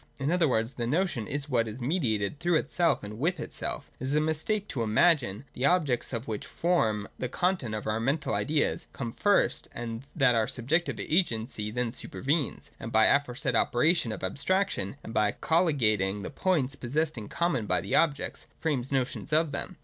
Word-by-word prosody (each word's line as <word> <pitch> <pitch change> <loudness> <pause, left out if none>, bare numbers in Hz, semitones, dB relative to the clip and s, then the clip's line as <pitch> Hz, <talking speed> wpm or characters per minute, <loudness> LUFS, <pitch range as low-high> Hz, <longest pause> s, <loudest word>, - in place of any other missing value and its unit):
In 140 +3 0
other 175 -2 +3
words, 115 -1 0
the 120 -1 -3
notion 150 - 0
is 145 0 -3
what 120 -5 +1
is 110 +3 -6
mediated 120 - 0
through 175 0 +2
itself 165 +3 +1
and 105 +2 -7
with 170 +4 0
itself. - - -4
It 130 - -4
is 135 +3 0
a - - +5
mistake 160 +7 0
to 125 - -3
imagine 115 - +3
that 130 - -13
the 130 +3 +1
objects 150 -9 +1
which 110 -2 -4
form 110 - +1
the 125 - -2
content 175 - 0
of 105 - -5
our 110 +1 0
mental 135 +6 0
ideas 150 0 0
come 120 -4 -4
first 205 - +2
and 115 -1 -5
that 135 -6 +4
our 110 -2 +2
subjective 155 +8 0
agency 115 - 0
then 120 +1 -1
supervenes, 140 +4 -2
and 115 - -6
by 110 0 +5
the - - +6
aforesaid 125 -2 -2
operation 125 +2 +2
of 105 - -6
abstraction, 140 - 0
and 110 - -8
by 105 -2 +2
colhgating 110 - +1
the - - -5
points 150 -4 +1
possessed 150 +5 -1
in 110 -4 -6
common 150 -11 0
by 90 - +2
the 100 +3 -4
objects, 150 -4 +1
frames 140 -5 -1
notions 135 +3 -1
of 155 0 +3
them. 165 +5 -3
135 Hz, 190 wpm, -28 LUFS, 115-160 Hz, -, the